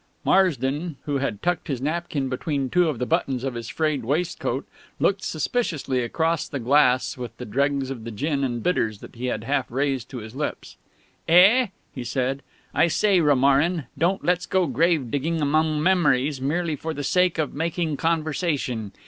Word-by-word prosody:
Marsden, 155 -3 +2
who 145 -2 -1
had 115 -7 -3
tucked 175 0 0
his 135 -6 -2
napkin 150 -1 -2
between 135 +1 -2
two 180 -2 +3
of 145 - -3
the 125 - -1
buttons 135 -5 0
of 135 -2 -2
his 115 -1 -6
frayed 155 0 -1
waistcoat, 145 -1 -1 0.3
looked 195 0 +1
suspiciously 155 - -1
across 160 +7 0
the 140 - -4
glass 130 0 +3
with 125 -1 -7
the 125 - -7
dregs 135 +3 0
of 120 -4 -6
the 115 - -6
gin 140 +5 -1
and 120 -3 -2
bitters 110 - 0
that - - -12
he 125 +2 -4
had 110 -3 -2
half 135 -1 -1
raised 135 -1 -1
to 130 - -7
his 110 -1 -8
lips. 150 +1 -4 0.5
"Eh?" 195 +9 +6 0.3
he 130 - -5
said. 130 +2 -1 0.3
"I - - +4
say, 190 +2 +3
Romarin, 145 +3 +3
don't 170 +6 0
let's 180 0 +1
go 190 -1 +2
grave 150 -2 +1
digging 160 +4 -1
among 155 +1 +1
memories 145 -7 +2
merely 160 +3 0
for 160 +3 -5
the 145 - -4
sake 180 +3 +2
of 155 -3 -1
making 160 0 -1
conversation. 155 - -1
145 Hz, 175 wpm, -24 LUFS, 130-165 Hz, 0.5 s, Eh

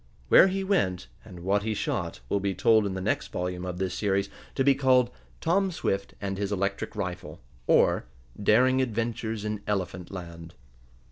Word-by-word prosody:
Where - - +8
he 195 +1 -1
went, 95 - 0 0.2
and 90 -5 -11
what 100 +3 +1
he 110 +1 -2
shot, 65 - -3
will 100 - 0
be 100 -1 -1
told 110 +2 +4
in 95 - -4
the 95 - -3
next - - -1
volume 90 0 -4
of 90 -1 -4
this 95 -1 -2
series, 100 0 0 0.2
to 135 - +2
be 140 +1 +5
called: 130 -2 +3 0.3
"Tom 190 +4 +2
Swift 100 - -2
and 95 -1 -3
His 100 0 -2
Electric 100 0 -2
Rifle; 90 -3 -5 0.3
or, - - +4 0.4
Daring 130 +6 +4
Adventures 115 -2 -2
in 105 -1 -3
Elephant 95 -3 -2
Land." 85 -2 -9
100 Hz, 175 wpm, -27 LUFS, 95-120 Hz, 0.4 s, Where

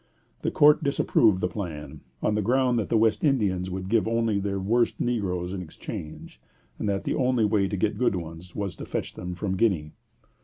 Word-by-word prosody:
The - - 0
court 150 +2 +5
disapproved 110 -8 +3
the - - +2
plan, 75 -7 -6 0.2
on 105 - +2
the 105 - +1
ground 125 +2 +2
that 105 - -3
the 115 - +3
West 110 0 +2
Indians 100 - +1
would 95 0 -4
give 110 +1 +2
only 115 -2 +1
their 100 0 -2
worst 115 +5 +1
negroes 95 -7 -1
in 95 - -4
exchange, 80 -2 -8 0.4
and - - -1
that 100 -1 -1
the - - -1
only 125 -4 +2
way 105 -2 +2
to 100 - -3
get 105 +3 0
good 125 -5 +2
ones 85 +1 -8
was 100 -4 -3
to - - -7
fetch - - -3
them 90 0 -6
from 95 +1 -2
Guinea. 90 -10 +1
100 Hz, 200 wpm, -26 LUFS, 90-115 Hz, 0.4 s, court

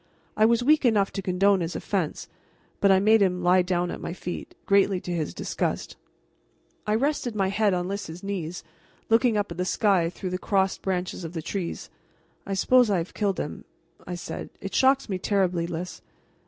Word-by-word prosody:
I 215 - +4
was 235 +1 +2
weak 300 +3 +4
enough 210 -5 +3
to 195 - -4
condone 195 +1 +3
his 170 0 -3
offense, - - -2 0.5
but 200 - +4
I 190 - +6
made 215 +2 +5
him 180 -2 +1
lie 180 +1 +5
down 180 -1 -1
at - - -6
my - - -4
feet, 175 -1 -7
greatly 200 -1 +3
to 180 - -6
his 160 -3 -2
disgust. - - -3 0.9
I 210 - +2
rested 255 -2 0
my 195 -2 +1
head 200 -1 +2
on 180 0 -2
Lys's 190 -3 -5
knees, 180 -4 -4 0.5
looking 225 0 +4
up 205 -3 -1
at 170 - -7
the - - +2
sky 185 -3 +2
through 180 +1 -6
the 185 - -2
crossed 190 0 0
branches 185 -1 -2
of 165 0 -6
the 165 -2 -4
trees. 180 -1 -4 0.6
"I 195 - -1
suppose 250 +4 +4
I 200 - +2
have 170 +1 -4
killed 200 -3 -1
him," - - -5 0.4
I 180 - -4
said. 175 - -6
"It 195 - -6
shocks 265 +1 +3
me 190 -4 -3
terribly, 185 -4 +1
Lys." 175 +1 -6
195 Hz, 195 wpm, -26 LUFS, 180-210 Hz, 0.9 s, I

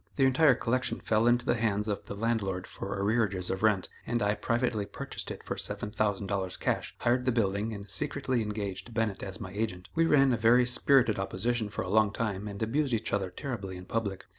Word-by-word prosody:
The 135 - +4
entire 130 +1 +5
collection 125 +2 0
fell 110 +1 +2
into 120 0 +3
the - - +3
hands 110 -3 0
of 105 -2 -2
the - - -6
landlord 100 -4 -1
for 100 +1 -5
arrearages 100 -3 +1
of 95 - -3
rent, 105 -4 +3 0.2
and 120 -2 0
I 105 0 +3
privately 115 -1 0
purchased - - -6
it - - -7
for - - -3
$7,000 100 -3 -2
cash, - - -1
hired 125 +1 +1
the 130 - +3
building, 105 -1 0
and 100 -2 -7
secretly 135 -1 -1
engaged 105 +1 -4
Bennett 110 -4 0
as 95 +2 -6
my 95 -4 -6
agent. 100 -3 -3
We 165 0 +3
ran 135 -4 +5
a - - +1
very 120 +3 +5
spirited 125 -3 +3
opposition 105 +4 -1
for - - -3
a - - -6
long 105 +1 +3
time 105 -2 -2
and 100 +1 -4
abused 130 +3 +1
each 110 - -3
other 95 -2 0
terribly 100 -3 -5
in 90 - -10
public. 100 -3 -3
110 Hz, 205 wpm, -30 LUFS, 100-120 Hz, 0.2 s, entire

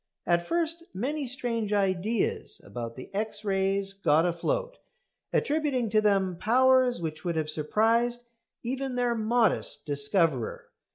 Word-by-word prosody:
At 170 0 +1
first 335 0 -1
many 275 +7 -2
strange 230 -4 -1
ideas 200 +2 0
about 115 -1 -6
the 130 +9 -10
X 215 +1 -3
rays 195 0 0
got 165 -4 +3
afloat, - - -2 0.5
attributing 285 -7 0
to 215 0 +4
them 195 -4 +2
powers 255 +3 +4
which 160 -2 -5
would 170 -2 -1
have 155 -1 -1
surprised 230 +9 +1 0.4
even 260 +1 -3
their 245 -1 +1
modest 225 -9 +1
discoverer. 145 - 0
215 Hz, 125 wpm, -28 LUFS, 175-245 Hz, 0.5 s, to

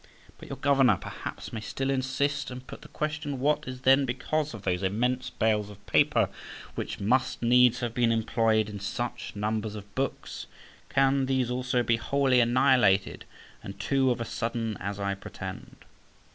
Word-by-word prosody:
But - - -11
your - - -5
governor, 135 -7 +4
perhaps, - - -7
may 110 - -3
still 135 +5 -2
insist, 135 +2 -1
and 125 0 -8
put - - -10
the - - -12
question, 150 -2 -3
What 150 +2 +1
is 130 0 -6
then 135 +2 +5
become 140 +4 -1
of 105 -3 -9
those 90 0 0
immense 120 +7 0
bales 105 -2 0
of 105 0 -14
paper - - +3 0.5
which - - -5
must 130 +5 +1
needs 125 0 +5
have 120 -1 -2
been 120 -1 +2
employed 110 -1 +2
in 105 -1 -7
such 120 +4 -4
numbers 110 +1 -2
of 100 -1 -10
books? 135 +1 -4 0.4
Can 135 0 +2
these 130 -2 +1
also 125 0 0
be 115 -1 +2
wholly 130 +2 +2
annihilated, 120 -5 +3 0.4
and 100 0 -9
to 135 +4 +2
of 120 - 0
a 115 - -2
sudden, 115 -1 -3
as 100 +1 -4
I 100 0 -1
pretend? 100 - -9
120 Hz, 170 wpm, -28 LUFS, 110-135 Hz, 0.5 s, then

